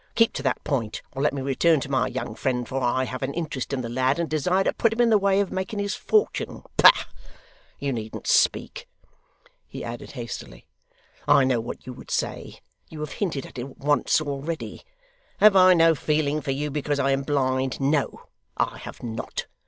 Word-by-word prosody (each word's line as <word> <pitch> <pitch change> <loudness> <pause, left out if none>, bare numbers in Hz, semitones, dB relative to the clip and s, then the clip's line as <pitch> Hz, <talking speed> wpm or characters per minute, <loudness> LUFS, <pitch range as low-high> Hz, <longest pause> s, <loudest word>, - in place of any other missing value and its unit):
Keep 230 -1 +4
to - - -4
that 135 -2 -1
point, 120 -7 -2
or 135 - -5
let 150 - +3
me 140 -1 -4
return 150 +4 +3
to - - -4
my 130 -2 +2
young 130 +1 -4
friend, 125 -3 -2
for 135 +1 -3
I 130 +1 +1
have 130 0 -5
an 135 +1 -3
interest 150 -7 -3
in 135 -2 -1
the 120 - -4
lad, 130 +3 +1
and 170 -1 -1
desire 180 +5 +1
to - - 0
put 230 - +2
him 225 - -4
in 235 -1 +4
the 215 - +6
way 195 0 +2
of 200 -2 0
making 190 +3 -3
his 205 0 -1
fortune. 430 0 0
Bah! - - +7 0.7
you 140 -1 -2
needn't 110 -2 -6
speak,' - - +1 0.8
he - - -8
added 120 0 -7
hastily; 120 -4 -7 0.6
'I 140 - +6
know 130 -2 +2
what 115 - -7
you 130 - -7
would - - -13
say: - - -3 0.3
you 155 - -9
have 150 - -4
hinted 165 -9 -3
at - - -9
it 130 +2 -7
once 145 +1 +2
already. 150 +2 -5 0.6
Have 210 -1 +6
I 185 -1 +7
no 165 -1 +5
feeling 150 0 0
for 145 - -6
you, 145 +2 -1
because 145 0 -1
I 135 -1 +2
am 135 0 +1
blind? 130 -2 0
No, 140 +1 0 0.3
I - - -1
have - - -10
not. 115 -1 -4
140 Hz, 200 wpm, -25 LUFS, 130-165 Hz, 0.8 s, Bah